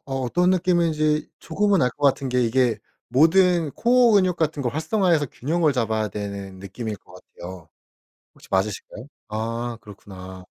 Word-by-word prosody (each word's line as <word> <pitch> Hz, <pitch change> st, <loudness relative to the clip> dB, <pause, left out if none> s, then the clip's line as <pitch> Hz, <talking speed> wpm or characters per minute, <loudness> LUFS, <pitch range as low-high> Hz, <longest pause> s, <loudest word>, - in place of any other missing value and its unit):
어떤 135 Hz, +7 st, 0 dB
느낌인지 165 Hz, -4 st, +1 dB
조금은 195 Hz, 0 st, +1 dB
알 125 Hz, -, +2 dB
것 145 Hz, +4 st, -7 dB
같은 135 Hz, 0 st, +1 dB
게 125 Hz, 0 st, +1 dB
이게 120 Hz, -1 st, +1 dB, 0.3 s
모든 165 Hz, +4 st, +3 dB
코어 240 Hz, 0 st, +4 dB
근육 185 Hz, -4 st, +3 dB
같은 155 Hz, -3 st, -1 dB
거 125 Hz, -, 0 dB
활성화해서 160 Hz, -, +1 dB
균형을 155 Hz, +5 st, 0 dB
잡아야 110 Hz, -4 st, -1 dB
되는 100 Hz, -1 st, -6 dB
느낌일 105 Hz, +3 st, -6 dB
것 -, -, -20 dB
같아요. 90 Hz, -2 st, -11 dB, 0.7 s
혹시 -, -, -18 dB
맞으실까요? 105 Hz, +4 st, -2 dB, 0.2 s
아 115 Hz, +2 st, -3 dB
그렇구나. 95 Hz, -3 st, -11 dB
130 Hz, 325 characters per minute, -23 LUFS, 105-170 Hz, 0.7 s, 코어